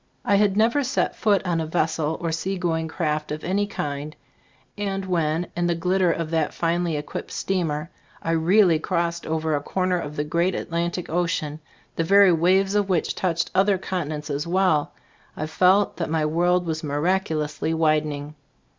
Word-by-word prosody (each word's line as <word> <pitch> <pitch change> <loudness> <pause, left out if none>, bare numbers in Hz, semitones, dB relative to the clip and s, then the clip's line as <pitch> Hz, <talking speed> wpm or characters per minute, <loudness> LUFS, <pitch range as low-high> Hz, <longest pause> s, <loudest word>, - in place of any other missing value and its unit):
I - - +2
had 200 -1 +2
never 235 +6 +3
set 255 - 0
foot 200 -3 +2
on 170 -2 0
a 160 - -3
vessel 160 -1 0
or 165 -1 -2
seagoing 165 -1 -1
craft 155 -2 -2
of 150 +1 -4
any 200 +3 0
kind, 145 -5 -4 0.6
and 195 -2 -3
when, 165 -2 0
in 175 0 0
the 170 - +1
glitter 180 +1 +2
of 165 -1 -3
that 160 -2 0
finely 170 -1 0
equipped 145 - -6
steamer, 165 -4 -2 0.3
I 165 - -1
really 170 +1 +4
crossed 170 +1 -2
over 160 -1 0
a 145 - -1
corner 185 +3 0
of 150 -2 -6
the 150 - -1
great 170 +4 0
Atlantic 170 +1 -2
ocean, 160 -3 -1 0.4
the 165 - +1
very 200 +2 +6
waves 185 +4 +3
of 205 -1 +1
which 180 -4 +1
touched 170 -3 -1
other 195 +1 +3
continents 155 -5 -4
as 145 +3 -2
well, 180 -4 +2 0.5
I 155 - -2
felt 185 +5 +3
that 165 - -2
my 160 -1 +1
world 175 +3 +2
was 160 -1 -3
miraculously 155 0 -1
widening. 155 -2 0
170 Hz, 170 wpm, -24 LUFS, 155-185 Hz, 0.6 s, very